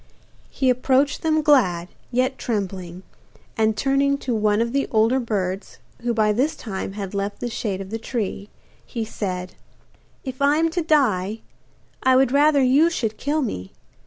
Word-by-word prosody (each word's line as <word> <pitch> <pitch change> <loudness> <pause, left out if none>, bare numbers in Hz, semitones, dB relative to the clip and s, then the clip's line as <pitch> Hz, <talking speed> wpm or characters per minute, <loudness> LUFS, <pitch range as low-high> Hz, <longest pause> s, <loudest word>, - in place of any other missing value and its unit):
He 260 -2 +1
approached 260 +3 +1
them 310 -1 +1
glad, 185 - +3 0.2
yet 255 +2 0
trembling, 190 -5 -4 0.5
and 220 -1 +1
turning 275 +3 +2
to 260 -3 -3
one 210 -1 +2
of 235 +1 0
the 275 0 +1
older 225 +4 +3
birds, 195 -5 -3 0.2
who 240 0 0
by 215 -2 +2
this 270 +8 +1
time 195 -3 -5
had 200 -2 -6
left 200 +1 -3
the 240 - -4
shade 200 -4 -3
of 195 +1 -8
the 225 - -3
tree, 210 -4 -4 0.3
he 230 -3 -4
said: 185 -4 -4 0.7
'If 260 0 -7
I 285 +2 +4
am 330 +1 +2
to 350 +1 -1
die, 225 - +1 0.6
I 260 0 +4
would 260 -1 +4
rather 285 0 +4
you 280 +6 +5
should 225 -10 -2
kill 295 +2 0
me. 95 - -5
235 Hz, 165 wpm, -22 LUFS, 205-275 Hz, 0.7 s, you